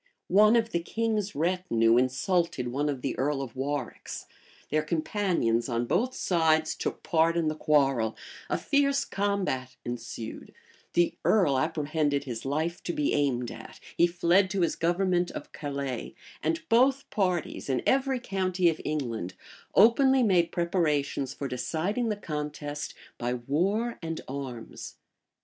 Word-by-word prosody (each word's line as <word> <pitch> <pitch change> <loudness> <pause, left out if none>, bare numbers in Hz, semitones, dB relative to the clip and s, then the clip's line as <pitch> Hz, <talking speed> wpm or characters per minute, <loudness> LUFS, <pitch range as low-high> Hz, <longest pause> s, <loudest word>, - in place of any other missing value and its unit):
One 210 +4 +6
of 230 -1 +2
the 170 - +1
king's 215 +2 -1
retinue 155 -9 +2
insulted 130 +2 +1
one 145 +4 -1
of 135 -3 -4
the 135 - -1
earl 140 +1 +1
of 120 -4 -9
Warwick's: 135 -1 -4 0.5
their 155 +1 +3
companions 155 - 0
on 120 0 0
both 240 - 0
sides 160 -3 +2
took - - -4
part 165 -1 +2
in 165 -2 +2
the 155 - -3
quarrel: 135 -8 +2 0.3
a - - +1
fierce 280 -1 +2
combat 190 -11 -1
ensued: 120 -2 -6 0.4
the 175 0 +3
earl 160 -11 +3
apprehended 145 0 0
his 120 -4 -6
life 160 +5 -1
to 175 - -1
be 150 - 0
aimed 125 -4 0
at: 115 0 -11 0.2
he 170 - +5
fled 175 +2 +3
to 190 -1 -1
his 170 - +1
government 175 +1 +1
of - - -8
Calais; 140 -3 -4 0.3
and 325 -1 -1
both 265 +3 +3
parties, 180 -7 -1
in 130 -2 0
every 265 -1 +2
county 185 -5 +1
of 160 - -3
England, 120 - -3 0.4
openly 260 +5 +6
made 180 -6 +3
preparations 150 -6 0
for 140 - -4
deciding 165 - -1
the 210 - 0
contest 150 -4 -5 0.2
by 120 +1 -1
war 190 - 0
and 165 -1 -4
arms. 130 -4 -7
160 Hz, 145 wpm, -28 LUFS, 135-195 Hz, 0.5 s, One